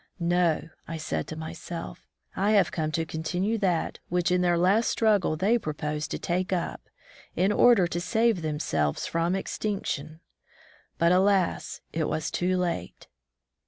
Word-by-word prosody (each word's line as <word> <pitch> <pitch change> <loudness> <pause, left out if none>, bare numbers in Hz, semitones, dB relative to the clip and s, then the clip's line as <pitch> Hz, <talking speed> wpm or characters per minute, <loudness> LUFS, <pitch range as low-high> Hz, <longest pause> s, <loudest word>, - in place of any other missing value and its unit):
No, 170 -2 +1 0.2
I 165 - -4
said 160 - -3
to 155 - -6
myself, 165 +1 -7 0.3
I 205 +3 +2
have 205 - +4
come 155 -2 -2
to 165 0 0
continue 180 +8 -2
that 180 -5 0
which 180 0 +1
in 180 0 +3
their 175 -1 +3
last 195 +6 +3
struggle 205 -8 +2
they 215 +8 +2
pro 155 -8 -4
posed 150 0 -3
to - - -3
take 180 +2 -2
up, 175 -2 -2 0.5
in 190 +4 +2
order 225 -3 +5
to 175 0 -3
save 225 -1 +2
themselves 150 - -1
from 170 +2 0
extinction; 175 -6 -3 0.8
but 170 +1 +3
alas! 190 0 +2
it 160 -1 0
was 155 +1 -2
too 185 +1 0
late. 180 -2 -3
175 Hz, 155 wpm, -27 LUFS, 160-195 Hz, 0.8 s, order